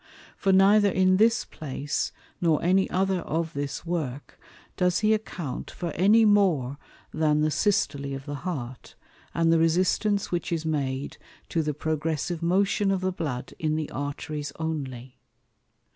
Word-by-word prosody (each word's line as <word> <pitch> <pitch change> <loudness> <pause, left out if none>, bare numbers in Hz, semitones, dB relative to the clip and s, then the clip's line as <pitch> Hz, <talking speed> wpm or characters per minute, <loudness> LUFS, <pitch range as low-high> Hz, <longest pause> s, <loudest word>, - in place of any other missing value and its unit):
For 195 - +1
neither 200 +2 +6
in 185 0 +3
this 225 +3 +3
Place, 145 0 -3 0.3
nor 165 -3 +2
any 190 +2 +3
other 190 0 +1
of 165 0 -2
this 140 +3 -4
Work, 150 -6 -4 0.3
does 180 0 +1
he 215 0 +4
account 175 -10 -4
for 170 -2 -5
any 210 +8 +5
more 170 -11 +3 0.3
than 150 -1 +2
the 155 0 +2
Systole 140 -5 0
of 135 0 -8
the 145 - -5
Heart, 130 -9 -6 0.4
and 165 0 +3
the 165 - +4
resistance 185 +5 +1
which 175 -1 -2
is 165 -1 -1
made 140 -3 -2 0.3
to 165 - +1
the 150 -2 -2
progressive 160 +2 -2
motion 195 +3 +2
of 195 -1 +1
the 185 0 0
Blood 145 -8 -4
in 155 -1 0
the 155 -1 -3
Arteries 145 +1 -4
only. 130 -6 -5
165 Hz, 150 wpm, -26 LUFS, 145-185 Hz, 0.4 s, neither